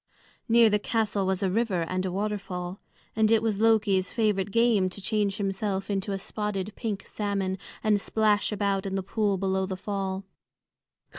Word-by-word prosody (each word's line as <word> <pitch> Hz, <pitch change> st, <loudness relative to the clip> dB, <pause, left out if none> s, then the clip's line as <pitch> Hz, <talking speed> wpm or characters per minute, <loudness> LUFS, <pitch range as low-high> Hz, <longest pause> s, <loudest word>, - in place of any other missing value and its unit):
Near 230 Hz, 0 st, +7 dB
the 210 Hz, -, +3 dB
castle 205 Hz, -3 st, 0 dB
was 190 Hz, +1 st, 0 dB
a 190 Hz, -, +2 dB
river 205 Hz, -5 st, +1 dB
and 185 Hz, +3 st, -2 dB
a -, -, -3 dB
waterfall, 190 Hz, -2 st, -3 dB, 0.4 s
and 220 Hz, -1 st, +3 dB
it 225 Hz, -1 st, +4 dB
was 215 Hz, -3 st, 0 dB
Loki's 210 Hz, -4 st, +3 dB
favorite 210 Hz, -4 st, +1 dB
game 225 Hz, -3 st, +3 dB
to 185 Hz, -, -8 dB
change 205 Hz, 0 st, 0 dB
himself 195 Hz, 0 st, -2 dB
into 195 Hz, 0 st, -1 dB
a 195 Hz, -, -1 dB
spotted 210 Hz, 0 st, -3 dB
pink 210 Hz, -5 st, -4 dB
salmon 195 Hz, -2 st, -2 dB, 0.2 s
and 210 Hz, -2 st, +3 dB
splash 215 Hz, -1 st, +2 dB
about 200 Hz, -1 st, 0 dB
in 195 Hz, -, -3 dB
the 195 Hz, -, -1 dB
pool 200 Hz, 0 st, 0 dB
below 190 Hz, 0 st, 0 dB
the 190 Hz, -1 st, -4 dB
fall. 195 Hz, -1 st, -3 dB
200 Hz, 170 wpm, -27 LUFS, 190-215 Hz, 0.4 s, Near